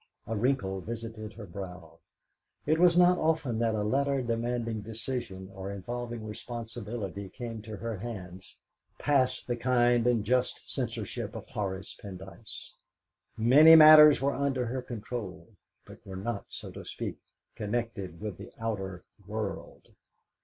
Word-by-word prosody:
A 115 - -3
wrinkle 105 -5 0
visited 110 0 -6
her 105 0 -9
brow. 90 -3 -9 0.7
It 155 +2 +2
was 175 -1 +6
not 180 0 +6
often 155 -8 +1
that 115 -1 +1
a 105 - 0
letter 135 +4 +1
demanding 115 -1 -1
decision 110 -3 -5
or 95 +1 -6
involving 120 +3 -5
responsibility 110 -3 -6
came 115 -1 -6
to 110 -1 -8
her 115 +1 -4
hands 95 -4 -8 0.4
past 130 -3 +2
the 120 - -1
kind 120 -1 +3
and 120 -3 +3
just 125 +3 0
censorship - - -3
of - - -6
Horace 95 -2 -4
Pendyce. 95 +2 -9 0.6
Many 145 +8 +8
matters 155 -1 +10
were 140 +1 +2
under 135 -2 0
her 130 +2 -3
control, 105 -8 -6 0.4
but - - -14
were 95 - -8
not, 100 +2 -3
so - - -8
to - - -9
speak, - - -5 0.4
connected 105 -5 -3
with 105 -4 -5
the - - -9
outer 95 -6 -4 0.2
world. 105 -1 -5
115 Hz, 140 wpm, -29 LUFS, 100-125 Hz, 0.7 s, matters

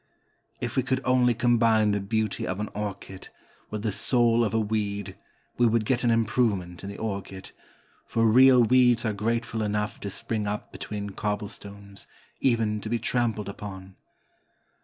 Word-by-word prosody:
If 120 -2 -4
we - - +5
could 130 0 0
only 125 -1 +3
combine 115 -3 +3
the 100 - 0
beauty 110 +2 -1
of 95 +1 -3
an 105 - -3
orchid 100 -2 -6 0.4
with 105 -1 -5
the 110 - 0
soul 120 +3 +3
of 110 - 0
a 115 - +1
weed 100 -3 -2 0.4
we 120 - +5
would 115 -1 +1
get 125 +2 0
an 120 - +3
improvement 105 -6 0
in 100 - -5
the 100 - -7
orchid, 100 -3 -5 0.6
for 115 0 +1
real 125 +2 +7
weeds 125 0 +4
are 110 - 0
grateful 115 +2 -2
enough 105 0 -2
to 100 - -5
spring 105 +1 -3
up 105 +1 -4
between 100 -1 -6
cobblestones, 100 0 -5 0.3
even 115 -4 +1
to 110 - -6
be 120 - +1
trampled 115 -3 -1
upon. 95 -2 -8
110 Hz, 160 wpm, -26 LUFS, 100-115 Hz, 0.6 s, real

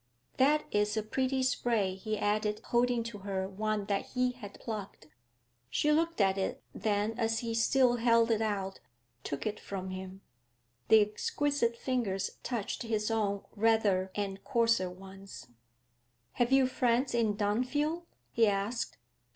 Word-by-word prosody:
'That 295 +3 +4
is 210 +1 +1
a 215 - 0
pretty 260 +4 0
spray,' 230 -6 +1
he 215 +3 -3
added, 210 0 0
holding 240 0 +2
to 230 -2 -7
her 190 -1 -3
one 210 +1 -2
that 200 -1 0
he 250 0 +2
had 215 -5 -10
plucked. 210 -7 -6 0.6
She 300 - +2
looked 330 0 +1
at 195 -1 +3
it; 190 - -2
then, 210 0 0
as 225 -1 +1
he 230 -1 -3
still 245 +2 +3
held 230 0 +4
it 220 -1 +2
out, 195 -3 -2 0.4
took 140 - -4
it 210 -1 -2
from 190 -1 -5
him. 190 +1 -7 0.7
The 220 0 +7
exquisite 235 - 0
fingers 210 -8 -1
touched 235 -6 -3
his 220 -1 -1
own 200 -3 0
redder 210 -4 +2
and 200 -1 -3
coarser 230 -5 +2
ones. 195 -3 -11 0.8
'Have 245 - 0
you 270 -1 +6
friends 255 0 +1
in 225 -3 +2
Dunfield?' 275 +11 0 0.2
he 230 -1 +4
asked. 205 +4 -1
220 Hz, 145 wpm, -31 LUFS, 200-245 Hz, 0.8 s, The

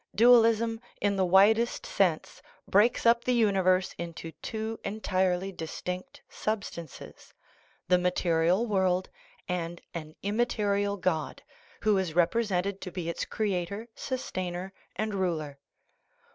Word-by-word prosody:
Dualism, 230 0 +5 0.2
in 200 -1 +1
the 190 -1 +2
widest 220 - +4
sense, - - 0 0.3
breaks 215 +6 +3
up 235 +1 +5
the 250 - +1
universe 190 -5 +3
into 165 -1 -6
two 220 0 -4
entirely 190 -2 0
distinct 180 +1 -6
substances 200 -7 -6 0.5
the 180 0 +4
material 180 +2 +2
world 190 -4 +1 0.4
and 175 -1 -3
an 155 -2 -7
immaterial 205 -2 0
God, 165 -5 -2 0.4
who 210 -2 +3
is 180 -4 -2
repre 175 +7 +3
sented 195 +1 -1
to 185 - -6
be 175 -3 -4
its 170 - -3
creator, 200 +2 -2
sustainer, 185 -8 -4 0.2
and 215 -1 -2
ruler. 160 -7 -2
190 Hz, 115 wpm, -29 LUFS, 180-220 Hz, 0.5 s, Dualism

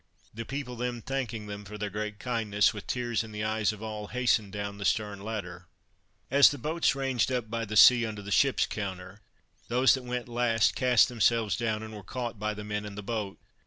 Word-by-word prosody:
The 115 +1 -6
people 135 -1 -5
then 120 -1 -4
thanking 120 -5 -3
them 105 0 -7
for 105 +1 -9
their 105 -1 -4
great 105 0 -4
kindness, 110 -3 +1
with 105 -2 -9
tears 120 -3 -1
in 110 - -10
the 105 0 -4
eyes 110 0 +1
of 110 0 -9
all, 105 -1 -5
hastened 115 -4 +1
down 100 0 -5
the - - -4
stern 105 -1 0
ladder. 90 -5 -6 0.6
As 140 +1 +8
the 145 - -5
boats 155 +3 0
ranged 135 -3 0
up 120 -4 -2
by 115 0 -2
the 105 0 -2
sea 120 +2 +8
under 105 -2 -4
the 100 - -7
ships 135 +5 +3
counter, 95 0 -6 0.5
those 125 +3 +4
that 130 - -2
went 125 -1 -4
last 120 -2 +2
cast 125 -3 +4
themselves 115 -2 +2
down, 110 -2 -2
and 110 0 -8
were 105 - -8
caught 120 0 -5
by 105 0 -2
the 105 - -7
men 105 0 -3
in 105 -1 -8
the 105 - -6
boat. 105 -2 -3
110 Hz, 215 wpm, -29 LUFS, 105-120 Hz, 0.6 s, As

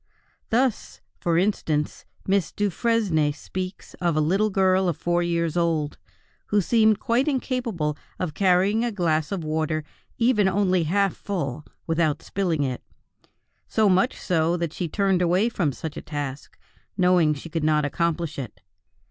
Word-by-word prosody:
Thus, 250 0 0 0.2
for 170 -1 +1
instance, 165 -6 0 0.2
Miss 195 -2 +1
Dufresne 205 -6 +1
speaks 185 +5 -6
of 170 -3 +1
a - - +2
little 190 +8 +2
girl 190 -1 +3
of 165 - -2
four 175 0 0
years 170 -2 0
old, 165 -4 0 0.5
who 205 - +2
seemed 215 +2 +3
quite 255 +3 +1
incapable 245 - -1 0.2
of 175 -5 -3
carrying 195 +5 +3
a 240 - 0
glass 160 -5 0
of 190 -4 -2
water 155 0 -1 0.3
even 230 -4 +3
only 185 -3 +2
half 195 +3 +1
full, 155 -8 -4 0.2
without 160 -2 0
spilling 175 -7 -1
it; 130 -2 -3 0.9
so 220 -1 +2
much 195 +7 +2
so 170 -1 +1
that 170 -3 -3
she 175 - -3
turned 195 0 +1
away 180 +6 +3
from 175 -10 0
such 155 +3 -6
a - - -5
task, 145 -2 -6 0.4
knowing 180 -5 +4
she 145 - -9
could 165 -1 -3
not 150 -1 +2
accomplish 165 0 -1
it. 120 -6 -7
175 Hz, 150 wpm, -24 LUFS, 155-200 Hz, 0.9 s, knowing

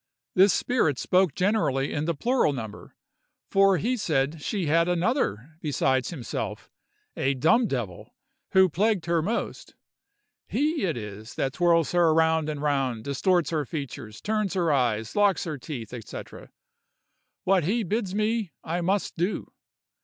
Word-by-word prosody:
This 190 +2 +6
spirit 165 - +1
spoke 180 -2 +2
generally 180 -9 +1
in 150 +1 -1
the 170 0 0
plural 235 - +2
number, 110 -5 -8 0.6
for 195 -1 +5
he 240 +9 0
said 155 - -1
she 195 +2 -2
had 165 +3 +3
another 170 - 0
besides 135 -3 +1
himself, 140 -9 -5 0.4
a 135 +1 0
dumb 160 - +3
devil, 120 - -5 0.4
who 190 0 +7
plagued 190 +1 +1
her 170 -1 +1
most. 210 +8 -3 0.7
"He 300 -5 0
it 165 -8 -1
is 105 0 -8
that 135 - -1
twirls 170 -2 +3
her 170 -3 +4
round 160 -1 +2
and 150 -1 -4
round, 135 -6 0
distorts 165 +5 +1
her 155 -2 0
features, 135 -6 -7
turns 215 -2 -1
her 170 -4 +2
eyes, 115 -5 0
locks 205 -2 +3
her 155 -6 -4
teeth, 120 -5 -6 0.2
&c. - - -6 1.2
What 185 -4 +3
he 220 +6 +1
bids 200 0 -2
me, 215 -3 0
I 170 +2 -2
must 190 +3 0
do!" 180 +5 -2
165 Hz, 145 wpm, -26 LUFS, 140-195 Hz, 1.2 s, who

